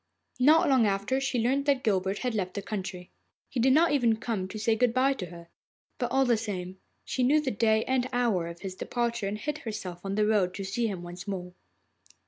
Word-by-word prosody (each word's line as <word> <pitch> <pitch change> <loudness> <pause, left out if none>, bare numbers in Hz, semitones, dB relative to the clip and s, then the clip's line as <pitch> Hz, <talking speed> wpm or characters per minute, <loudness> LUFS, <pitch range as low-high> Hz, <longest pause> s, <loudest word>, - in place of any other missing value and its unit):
Not 310 +7 +6
long 260 -5 +4
after 200 +7 0
she 270 -2 -1
learnt 265 +5 +1
that 275 -2 +2
Guilbert 195 -2 +1
had 250 - 0
left 185 -4 -2
the 200 - -3
country. 185 -4 -5 0.4
He 260 - -2
did 260 +3 +4
not 320 +5 +5
even 240 -6 +3
come 220 -5 -3
to 210 - -7
say 220 +1 +1
good 240 +1 +1
bye 265 +2 +4
to 190 -9 -6
her, 170 -1 -12 0.5
but, 245 -2 -1
all 270 +1 +3
the 240 -2 +3
same, 190 -4 -5 0.3
she 255 - -2
knew 280 +5 +4
the 285 -4 -1
day 220 +1 +2
and 255 -1 0
hour 230 -9 +1
of 170 0 -9
his 190 -2 -5
departure, 235 +1 -2
and 205 +2 -3
hid 300 +7 -4
herself 195 -7 -6
on 195 0 -3
the 210 0 +2
road 200 -4 +2
to 200 - -4
see 225 +5 -1
him 190 -5 -5
once 175 +1 -9
more. 180 -2 -5
220 Hz, 225 wpm, -28 LUFS, 190-255 Hz, 0.5 s, Not